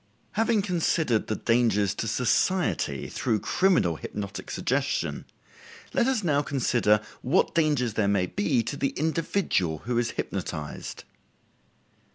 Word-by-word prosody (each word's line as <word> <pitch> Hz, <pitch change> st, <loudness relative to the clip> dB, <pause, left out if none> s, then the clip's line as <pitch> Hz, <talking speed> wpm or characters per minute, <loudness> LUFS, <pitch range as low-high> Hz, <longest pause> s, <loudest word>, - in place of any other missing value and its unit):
Having 225 Hz, -1 st, +2 dB
considered 165 Hz, -, +1 dB
the 110 Hz, -, -1 dB
dangers 110 Hz, -5 st, +2 dB
to 115 Hz, -, -3 dB
society 125 Hz, -, +1 dB
through 115 Hz, -4 st, -1 dB
criminal 165 Hz, -, +2 dB
hypnotic 100 Hz, +2 st, -6 dB
suggestion, -, -, -1 dB, 0.7 s
let 235 Hz, -, +2 dB
us 260 Hz, -6 st, +1 dB
now 145 Hz, -4 st, +2 dB
consider 120 Hz, -7 st, +2 dB, 0.2 s
what 130 Hz, -, +2 dB
dangers 145 Hz, -8 st, +2 dB
there 105 Hz, -2 st, +1 dB
may 100 Hz, -2 st, +2 dB
be 105 Hz, +5 st, 0 dB
to 140 Hz, -, -4 dB
the 140 Hz, -, -1 dB
individual 160 Hz, -, 0 dB
who 120 Hz, 0 st, +1 dB
is 120 Hz, -1 st, 0 dB
hypnotized. 80 Hz, -6 st, -5 dB
120 Hz, 125 wpm, -27 LUFS, 105-160 Hz, 0.7 s, Having